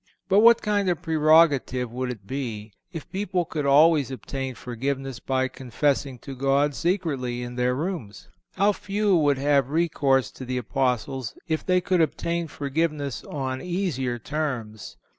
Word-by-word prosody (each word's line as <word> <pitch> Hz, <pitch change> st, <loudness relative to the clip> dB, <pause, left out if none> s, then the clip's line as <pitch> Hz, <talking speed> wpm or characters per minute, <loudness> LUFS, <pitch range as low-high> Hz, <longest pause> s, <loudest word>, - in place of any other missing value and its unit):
But 195 Hz, +1 st, +4 dB
what 230 Hz, +1 st, +6 dB
kind 205 Hz, -2 st, +1 dB
of 175 Hz, -1 st, -1 dB
prerogative 155 Hz, -6 st, +3 dB
would 125 Hz, +1 st, -3 dB
it 110 Hz, -6 st, -7 dB
be 110 Hz, -4 st, -5 dB, 0.2 s
if 165 Hz, -5 st, -7 dB
people 190 Hz, -2 st, -1 dB
could 150 Hz, -3 st, -3 dB
always 150 Hz, 0 st, +5 dB
obtain 130 Hz, +1 st, -5 dB
forgiveness 130 Hz, +2 st, -4 dB
by 130 Hz, -1 st, 0 dB
confessing 135 Hz, +1 st, -1 dB
to 135 Hz, -2 st, -7 dB
God 140 Hz, +2 st, +2 dB
secretly 140 Hz, -9 st, -1 dB
in 120 Hz, 0 st, -6 dB
their 125 Hz, 0 st, +1 dB
rooms? 145 Hz, -, -5 dB, 0.3 s
How 200 Hz, +2 st, +4 dB
few 205 Hz, 0 st, 0 dB
would 145 Hz, -4 st, +3 dB
have 140 Hz, -1 st, +2 dB
recourse 140 Hz, -5 st, +1 dB
to -, -, -10 dB
the 125 Hz, 0 st, -3 dB
Apostles 125 Hz, 0 st, -1 dB
if 160 Hz, -1 st, -1 dB
they 180 Hz, -1 st, +2 dB
could 180 Hz, -1 st, +2 dB
obtain 170 Hz, +1 st, -1 dB
forgiveness 145 Hz, -1 st, -2 dB
on 130 Hz, -2 st, -4 dB
easier 170 Hz, -10 st, -2 dB
terms! 120 Hz, -6 st, -4 dB
140 Hz, 150 wpm, -25 LUFS, 130-165 Hz, 0.3 s, what